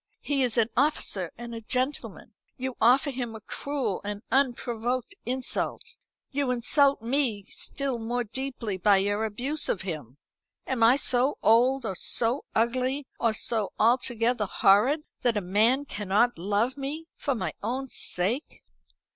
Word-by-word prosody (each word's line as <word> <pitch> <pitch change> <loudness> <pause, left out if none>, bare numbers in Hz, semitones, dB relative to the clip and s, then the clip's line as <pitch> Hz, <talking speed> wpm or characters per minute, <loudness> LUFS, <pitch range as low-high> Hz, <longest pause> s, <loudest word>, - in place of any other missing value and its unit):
He 285 -2 +1
is 245 -2 +1
an 230 -1 +3
officer 245 - +1
and 235 0 -8
a 230 - -6
gentleman. 255 +5 -3 0.2
You 260 -1 -4
offer 260 +5 +4
him 240 -3 -5
a - - -7
cruel, 255 -2 -3
an 205 +1 -5
unprovoked 250 - 0
insult. 260 - -3 0.3
You 280 -2 -1
insult 260 +1 +2
me 235 -5 0
still 275 -4 -3
more 240 +2 -2
deeply 235 -3 -4
by 200 +2 +4
your 205 +3 0
abuse 255 +8 -1
of 185 - -1
him. 150 -8 -6 0.5
Am 260 -3 -2
I 230 +3 +7
so 265 0 +1
old, 245 +3 +4
or 195 - -2
so 235 - +2
ugly, 255 +5 0
or 230 -2 +2
so 220 -1 -1
altogether 235 -1 +2
horrid, 220 - +3 0.2
that 235 -3 +1
a - - 0
man 220 +9 +2
cannot 210 +2 +1
love 205 +9 -1
me 290 +4 -5
for 275 - -2
my - - -3
own 255 +5 -3
sake?" 210 - -1
240 Hz, 145 wpm, -27 LUFS, 215-265 Hz, 0.5 s, I